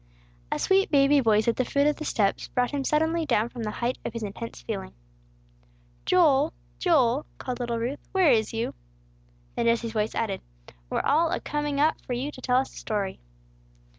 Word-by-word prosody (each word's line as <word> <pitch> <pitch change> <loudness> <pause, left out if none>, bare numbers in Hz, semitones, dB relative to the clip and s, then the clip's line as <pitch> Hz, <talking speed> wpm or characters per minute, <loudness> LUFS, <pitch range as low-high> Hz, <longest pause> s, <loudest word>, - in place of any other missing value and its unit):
A - - 0
sweet 390 +2 +3
baby 285 0 +5
voice 220 -3 +3
at 235 - +2
the 255 - +2
foot 280 +3 +1
of 300 0 +2
the 310 - -5
steps 200 -7 0
brought 245 0 0
him 285 -2 -2
suddenly 320 +4 +1
down 230 -6 +1
from 240 - -8
the 215 - -2
height 240 +4 -2
of - - -4
his 230 -1 -5
intense 195 - -6
feeling. 60 +1 -5 1.1
"Joel! 310 -5 +4 0.3
Joel!" 285 -6 +2
called 250 -1 -5
little 240 -1 -2
Ruth, 245 +5 -3
"where 370 -6 +4
is 220 -3 +2
you?" 225 +1 -2 0.8
Then 235 - 0
Jesse's 230 -1 +1
voice 215 -1 -1
added, 205 -4 -1 0.5
"We're - - 0
all 320 +4 +3
a - - 0
coming 295 -1 -2
up 310 +2 +2
for 250 - -4
you 260 +5 -2
to 255 - -12
tell 250 0 +2
us 265 - 0
a - - -13
story." 205 -3 -3
255 Hz, 195 wpm, -26 LUFS, 230-295 Hz, 1.1 s, baby